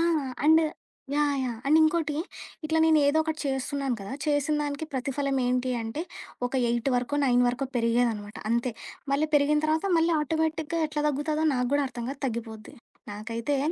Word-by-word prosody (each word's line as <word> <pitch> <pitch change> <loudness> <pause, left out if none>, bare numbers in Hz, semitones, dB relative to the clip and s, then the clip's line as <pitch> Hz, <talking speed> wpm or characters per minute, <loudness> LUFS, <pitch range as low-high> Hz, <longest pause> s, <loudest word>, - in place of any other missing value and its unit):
ఆ! - - +3 0.4
And 320 +1 +6 0.5
yeah! 295 -1 +2
Yeah! 240 -3 -3
And, 310 +3 +5
ఇంకోటి 315 -2 +1 0.5
ఇట్లా 320 +1 +1
నేనేదోకటి 315 0 +3
చేస్తున్నాను 270 -1 -1
కదా! 200 - -7
చేసినదానికి 295 0 0
ప్రతిఫలం 270 +1 -1
ఏంటి 250 +1 0
అంటే, 225 +9 -4 0.5
ఒక - - -25 0.2
8 240 +3 0
వరకో, 250 +4 -1
9 245 -1 +4
వరకో 250 +3 -2
పెరిగేదనమాట 230 -3 0
అంతే. 235 +1 +1 0.4
మళ్ళీ 300 +2 +1
పెరిగిన 295 +1 +3
తర్వాత, 315 +3 +1
మళ్ళీ 330 +1 +3
ఆటోమేటిక్‌గా 320 +2 -1
ఎట్లా 300 0 -2
దగ్గుతాదో 300 +2 -1
నాకు 250 -1 0
గూడా 285 0 +3
అర్థం 240 -2 -6
కాదు 275 0 -8
తగ్గిపోద్ది. 225 -3 -6 0.4
నాకైతే 230 +6 -2
280 Hz, 150 wpm, -27 LUFS, 245-310 Hz, 0.5 s, And